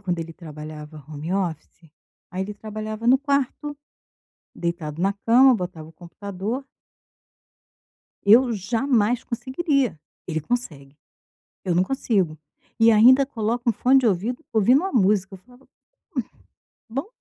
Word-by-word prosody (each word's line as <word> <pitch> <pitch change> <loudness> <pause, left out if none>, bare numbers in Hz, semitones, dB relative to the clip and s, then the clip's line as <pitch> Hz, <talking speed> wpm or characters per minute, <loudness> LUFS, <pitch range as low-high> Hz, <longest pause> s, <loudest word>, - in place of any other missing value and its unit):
quando 180 -4 -2
ele 165 0 -7
trabalhava 155 -2 -10
home 155 +3 -5
office, 170 -3 -4 0.4
aí 185 +1 -3
ele 205 +2 -6
trabalhava 215 +1 -6
no 260 +2 +6
quarto, 280 +1 -1 0.8
deitado 170 -2 -4
na 195 +2 +2
cama, 245 +5 +5
botava 175 -5 -5
o - - -15
computador. 200 - -6 1.6
Eu 235 +4 +6
jamais 230 +2 0
conseguiria. 260 - -1 0.3
Ele 160 -2 -2
consegue, 150 - -4 0.7
eu 180 -2 0
não 180 - +4
consigo, 195 - 0 0.4
e 225 0 +6
ainda 250 +5 +7
coloca 235 -1 -1
um - - +2
fone 260 +5 +4
de 250 - +2
ouvido, 225 - -1
ouvindo 230 +5 +5
uma 380 +4 -3
música, 195 -3 +2
eu - - -8
falo: 245 +7 -21
"Hum, - - -35 1.3
bom. 275 +7 -2
210 Hz, 135 wpm, -23 LUFS, 175-250 Hz, 1.6 s, ainda